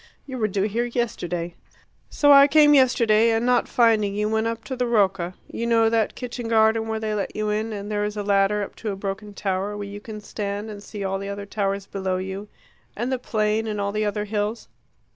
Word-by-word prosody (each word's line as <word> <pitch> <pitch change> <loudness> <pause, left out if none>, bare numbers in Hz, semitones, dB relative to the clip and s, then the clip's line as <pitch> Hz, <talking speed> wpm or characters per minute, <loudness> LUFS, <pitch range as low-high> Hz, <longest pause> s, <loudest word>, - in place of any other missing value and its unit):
You 260 -3 -6
were 215 - +2
due 195 -1 -1
here 220 +3 0
yesterday. 175 -8 -3 0.6
So 290 -1 +4
I 280 0 +9
came 295 0 +6
yesterday, 230 -5 +4
and, 225 +1 +1
not 250 -1 +3
finding 220 -4 +3
you, 210 +1 0
went 220 +1 +1
up 230 0 -4
to 260 - -5
the 250 -1 -1
Rocca 190 -6 +1
you 235 - -4
know 225 -1 +3
that 225 -2 +1
kitchen 245 -1 -5
garden 220 0 +3
where 220 0 -2
they 215 -1 -2
let 205 -2 -3
you 215 0 -1
in, 215 +2 -1
and 205 0 -5
there 205 0 0
is 210 0 -3
a 205 - -2
ladder 200 +1 +2
up - - -8
to 220 - -4
a - - -4
broken 200 +1 -5
tower, 195 +1 -2
where 205 -1 -5
you 200 +1 -7
can 215 0 -8
stand 205 0 -5
and 205 -1 -9
see 205 0 -7
all 195 0 -1
the 200 0 -5
other 200 0 -5
towers 200 -1 -2
below 190 -2 -2
you 190 +2 -5 0.5
and 240 +4 -2
the 260 - 0
plain 215 -1 0
and 210 -1 -3
all 200 0 -1
the 215 +1 -1
other 210 0 -1
hills?" 210 +2 -3
210 Hz, 230 wpm, -24 LUFS, 200-230 Hz, 0.6 s, I